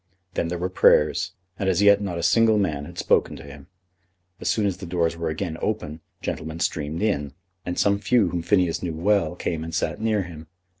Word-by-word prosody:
Then 85 - -1
there 90 +1 -3
were 90 +2 -1
prayers, 75 -4 +3 0.3
and 95 - +1
as 90 -1 +1
yet 100 0 +6
not 95 -4 -3
a 85 - -3
single 115 +1 +4
man 75 -8 -1
had - - -11
spoken - - +2
to - - -10
him. 70 -1 -12 0.7
As - - -2
soon 105 - +1
as 95 -3 0
the 95 - -8
doors 85 -1 0
were 85 -1 -3
again 80 +1 -4
open 80 -8 -3 0.2
gentlemen 80 +1 -4
streamed 80 +2 -2
in, 75 -10 0 0.3
and 90 - -3
some 100 0 +2
few 110 -3 +3
whom 85 0 -2
Phineas 90 -2 +1
knew 85 -3 -3
well 95 +2 +1
came 80 -2 -3
and 80 0 -5
sat 85 - -2
near 110 -3 +1
him. 80 -3 -10
85 Hz, 210 wpm, -24 LUFS, 80-100 Hz, 0.7 s, yet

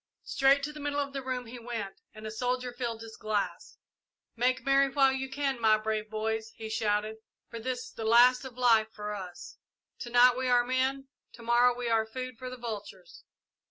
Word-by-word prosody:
Straight 275 +1 +3
to 300 +1 -3
the 300 - -9
middle 290 0 -2
of 280 -1 -3
the 275 - -3
room 255 -1 -3
he 240 +2 -9
went, 225 -5 -6
and 215 0 -10
a 215 - -4
soldier 250 +2 -2
filled 235 -2 -4
his 225 -1 -10
glass. 215 -2 -3 0.6
"Make 255 +2 +1
merry 275 0 +4
while 270 -1 +4
you 265 0 -3
can, 270 -2 -2
my 215 -1 +5
brave 215 0 -3
boys," 220 +1 -2
he 220 -1 -7
shouted, 215 0 0 0.3
"for 230 - -6
this 250 +2 -3
is - - -19
the 225 - -6
last 245 +4 +6
of 255 -2 -9
life 225 -3 +4
for 210 -1 -5
us! 185 -3 -8 0.4
To 240 - -6
night 245 +1 +6
we 260 0 -2
are 245 -1 +4
men 260 +2 0 0.3
to 235 - -13
morrow 240 +1 +4
we 245 -1 -4
are 225 -1 +2
food 255 +1 -6
for 255 -1 -6
the 255 - -8
vultures! 205 -6 -8
245 Hz, 205 wpm, -29 LUFS, 220-255 Hz, 0.6 s, last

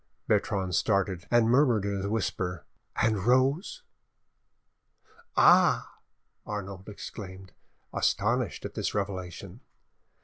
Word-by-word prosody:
Bertrande 95 -2 0
started, 95 -1 0
and 120 -2 +4
murmured 120 -4 +3
in 100 -1 -2
a 100 - -2
whisper, 95 -4 -2 0.3
"And 110 -4 +1
Rose?" 130 - +1 1.5
"Ah!" - - +4 0.4
Arnauld 100 -1 -6
exclaimed, 95 -2 -9 0.4
astonished - - 0
at - - -6
this - - -3
revelation. 95 -3 -4
100 Hz, 95 wpm, -28 LUFS, 95-115 Hz, 1.5 s, and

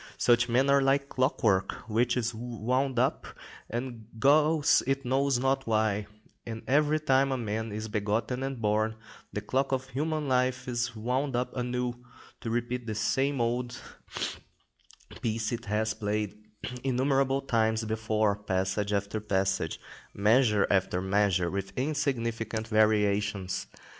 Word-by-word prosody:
Such 120 0 +3
men 130 +3 +3
are 140 0 +5
like 140 +1 +2
clockwork, 115 -7 +1
which 120 +3 +1
is 120 0 -1
wound 125 +3 -1
up, 130 +3 +1 0.4
and 120 -2 -5
goes 150 +4 +4
it 135 0 0
knows 135 +1 +2
not 135 +1 0
why; 110 -2 +1 0.4
and 115 -1 -6
every 150 +3 +3
time 135 -2 +3
a 130 - 0
man 110 -1 -3
is 110 +1 -4
begotten 110 +4 -1
and 135 -2 -3
born, 110 +1 +1 0.4
the - - -3
clock 135 +1 0
of 130 -1 -1
human 150 +3 -2
life 130 0 +1
is 120 -1 -2
wound 125 +4 -1
up 125 +1 -2
anew, 125 0 -1 0.5
to 115 - -5
repeat 120 +1 -2
the 110 - -3
same 135 +6 +1
old 120 +1 -1 1.4
piece 110 -1 -1
it 120 0 -4
has 110 +1 0
played 105 -1 -2 0.5
innumerable 135 +1 +2
times 110 -3 +1
before, 110 -1 +1
passage 95 +1 -1
after 100 +1 -1
passage, 95 -2 0 0.4
measure 105 0 +4
after 95 -2 +2
measure, 95 -2 +1
with 95 0 -4
insignificant 115 -6 -1
variations. 105 -3 +1
120 Hz, 135 wpm, -29 LUFS, 105-130 Hz, 1.4 s, are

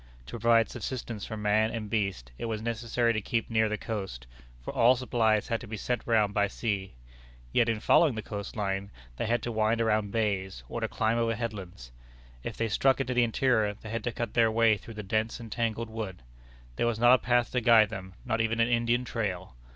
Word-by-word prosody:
To 115 - -7
provide 115 0 +4
subsistence 120 -2 -5
for 110 - -5
man 105 +1 +2
and 115 -2 -4
beast, 100 - -2
it - - -3
was 110 -2 -2
necessary 115 +1 0
to 110 - -1
keep 115 +3 -2
near 110 -1 +3
the 105 - -2
coast, 95 - -5 0.3
for - - -7
all 120 +3 +5
supplies 115 -4 +1
had 115 - -1
to 120 - -9
be 110 +1 -5
sent 125 +4 -2
round 110 -3 +3
by 100 0 +2
sea. 100 - -3 0.6
Yet 120 -1 +3
in 115 -2 0
following 145 +4 +4
the 110 - -4
coast 100 -1 -6
line, 100 -2 -2 0.3
they - - -2
had 120 +1 0
to 120 - -2
wind 110 +1 +1
around 110 -3 +1
bays, 100 - -1
or - - -5
to - - 0
climb 115 +1 0
over 115 -1 +1
headlands. 95 - -6 0.5
If - - -6
they 115 - 0
struck 135 +5 +2
into 130 -1 -1
the 120 0 +4
interior, 115 -3 +1
they 110 +1 -10
had 115 -1 -3
to 120 - 0
cut 115 -2 -4
their 115 -1 +4
way 115 0 +4
through 110 +2 -11
the 105 - -6
dense 110 +4 -1
and 115 -2 -9
tangled 115 0 -2
wood. 105 - -6 0.5
There 120 - +1
was 120 -2 0
not 120 +2 +6
a - - +7
path 120 0 +1
to 125 - 0
guide 115 -3 +6
them, 95 -3 -8
not 115 -2 0
even 115 0 0
an 115 +1 +3
Indian 120 +1 +1
trail. 95 - -3
110 Hz, 220 wpm, -29 LUFS, 105-115 Hz, 0.6 s, a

